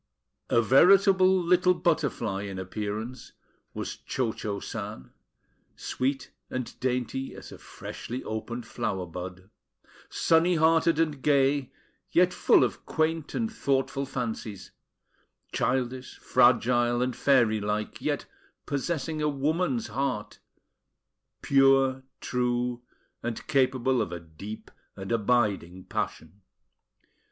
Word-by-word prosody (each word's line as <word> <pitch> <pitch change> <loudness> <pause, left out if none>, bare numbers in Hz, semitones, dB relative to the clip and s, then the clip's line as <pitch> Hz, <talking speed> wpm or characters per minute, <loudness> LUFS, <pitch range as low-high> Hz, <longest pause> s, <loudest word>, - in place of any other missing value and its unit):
A 115 - +4
veritable 185 - +6
little 180 +1 +4
butterfly 120 - 0
in 100 -1 -6
appearance 105 +5 -5 0.4
was - - -4
Cho 120 -4 -2
Cho 100 -1 -4
San, 105 - -7 0.6
sweet 135 +2 -2 0.2
and 130 -2 -4
dainty 130 +1 -2
as - - -11
a - - -11
freshly 125 +2 -7
opened 115 +2 -5
flower 95 -4 -3
bud; 90 +3 -8 0.6
sunny 170 +2 +3
hearted 160 0 +3
and 150 -4 0
gay, 140 -2 +2 0.4
yet - - +4
full - - +4
of - - -2
quaint 160 -1 -1
and 225 -1 -1
thoughtful 135 - 0
fancies; 110 -5 -5 0.8
childish, 125 +1 -1
fragile 120 0 +3
and 125 -1 -2
fairy 120 -6 +3
like, 105 +1 -3
yet - - -1 0.4
possessing 155 +2 -2
a 150 - +2
woman's 145 -4 0
heart, 125 -2 -3 1.0
pure, 135 -1 +4 0.2
true, 125 -1 -1 0.4
and 115 -1 -4
capable 130 -2 +2
of 90 - -3
a 85 - -4
deep 85 +7 -10 0.2
and 95 +2 -7
abiding 105 -6 +1
passion. 85 +3 -5
125 Hz, 110 wpm, -27 LUFS, 110-140 Hz, 1.0 s, veritable